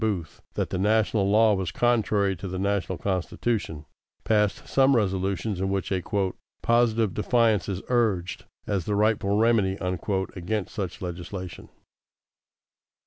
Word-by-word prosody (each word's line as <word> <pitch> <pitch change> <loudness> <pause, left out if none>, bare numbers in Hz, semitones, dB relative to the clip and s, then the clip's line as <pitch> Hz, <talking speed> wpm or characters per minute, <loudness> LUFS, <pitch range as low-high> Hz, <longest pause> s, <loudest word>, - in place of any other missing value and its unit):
Booth 100 -8 -2
that - - -2
the 90 - -1
national 105 0 +2
law 110 +1 +5
was 95 -3 -1
contrary 105 -5 +2
to 95 +2 -7
the 95 0 -4
national 100 -1 -1
Constitution, 95 -3 -2 0.4
passed 105 -2 +1
some 135 0 +4
resolutions 95 -1 0
in 95 - 0
which 95 0 -2
a 95 -1 +1 0.6
"positive 115 -4 +2
defiance 110 -2 +2
is 95 -1 -3
urged 110 -8 0 0.2
as 100 -5 -1
the 105 - -1
'rightful 105 -1 +2
remedy'" 110 -4 +3
against 95 +2 -2
such 95 -4 -4
legislation. 90 +1 -6
100 Hz, 130 wpm, -26 LUFS, 95-110 Hz, 0.6 s, law